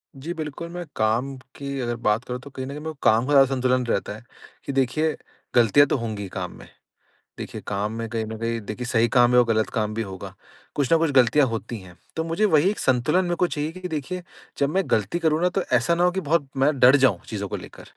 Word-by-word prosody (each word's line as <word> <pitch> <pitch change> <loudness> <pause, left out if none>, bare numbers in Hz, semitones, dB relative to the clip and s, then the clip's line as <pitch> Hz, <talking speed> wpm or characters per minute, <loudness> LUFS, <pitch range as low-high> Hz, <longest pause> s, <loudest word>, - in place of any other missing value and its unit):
जी 155 +6 -5
बिल्कुल, 160 +1 -6
मैं 175 0 -6
काम 115 +5 0 0.2
की 140 -1 -5
अगर 120 0 -2
बात 110 0 0
करूँ 125 0 -4
तो 140 - -11
कहीं 130 -1 -6
न - - -7
कहीं 145 +1 -6
मेरे 160 +1 -5
को - - -27
काम 115 +3 +4
का 145 - -2
ज़्यादा 135 -1 +7
संतुलन 130 -1 +1
रहता 105 -3 -1
है 110 - -13 0.4
कि 140 - -3
देखिए, 135 +4 +1 0.4
गलतियाँ 120 +5 +6
तो - - +1
होंगी 110 -4 -4
ही 95 - -7
काम 90 -1 -5
में। - - -13 0.7
देखिए - - -7
काम 105 +1 -2
में 115 0 -4
कहीं 115 -1 -2
न 110 0 -6
कहीं 115 0 -1
देखिए 125 +4 -5
सही 115 -1 +3
काम 120 0 +6
है 125 - +7
और 120 - +5
गलत 110 -1 +1
काम 110 -2 -2
भी 115 - -2
होगा। 95 -4 -7 0.4
कुछ 140 -3 0
ना 165 - +7
कुछ 160 -2 +1
गलतियाँ 135 +2 +5
होती 115 0 -4
हैं। 90 -2 -14 0.2
तो 160 - -1
मुझे 165 +6 0
वही 170 -2 +4
एक 210 - -3
संतुलन 130 +9 +2
मेरे 175 -1 -1
को 180 - +2
चाहिए 150 -1 -3
कि 185 +1 -7
देखिए 160 +3 -4 0.3
जब 140 - +1
मैं 190 +5 +1
गलती 110 - +1
करूँ 160 -1 +1
ना 180 - +3
तो 195 - +3
ऐसा 125 +8 +3
ना 175 - +1
हो 180 - +4
कि 190 +1 -2
बहुत 150 -1 +1
मैं 140 +2 +2
डर 125 +3 +7
जाऊँ 130 -10 +3
चीज़ों 100 -2 -4
को - - -4
लेकर। - - -12
130 Hz, 255 wpm, -24 LUFS, 115-155 Hz, 0.7 s, ज़्यादा